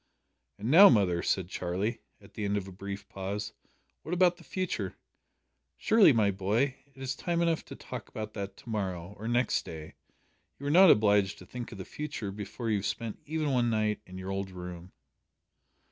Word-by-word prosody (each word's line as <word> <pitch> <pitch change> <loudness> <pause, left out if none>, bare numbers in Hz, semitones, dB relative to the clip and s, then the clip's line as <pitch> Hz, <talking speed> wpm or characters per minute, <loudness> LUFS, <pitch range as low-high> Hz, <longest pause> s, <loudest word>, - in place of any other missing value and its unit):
"And 110 +5 -2
now, 195 +6 +10
mother," 95 -7 +3
said 95 -3 0
Charlie, 95 +5 -2 0.2
at - - -18
the 105 - -5
end 100 0 +1
of 100 -1 -4
a - - -8
brief 100 +1 -7
pause, 100 +3 -4 0.5
"what 175 - -3
about 175 -1 +4
the 170 - -15
future?" 165 - -3 0.8
"Surely, 215 -7 +6
my 110 -5 +3
boy, 110 +8 0
it 140 -1 -21
is 135 -1 -2
time 170 +3 -1
enough 170 -2 +1
to - - -9
talk - - -8
about 110 0 -6
that 100 -1 -5
to - - -13
morrow, 95 -4 -3
or 110 - -5
next 120 +2 +1
day. 80 -1 -8 0.6
You 140 - -9
are 145 - +1
not 185 +3 +8
obliged 105 -4 +4
to - - -12
think 120 -1 -7
of 110 - -8
the 95 - -6
future 145 -9 -5
before 105 +3 -4
you 105 - +3
have 100 - -5
spent 115 0 -4
even 155 -1 -1
one 120 -2 +2
night 110 -1 0
in 90 0 -9
your 95 +1 -5
old 95 0 -3
room." 90 -1 -8
105 Hz, 195 wpm, -30 LUFS, 95-135 Hz, 0.8 s, now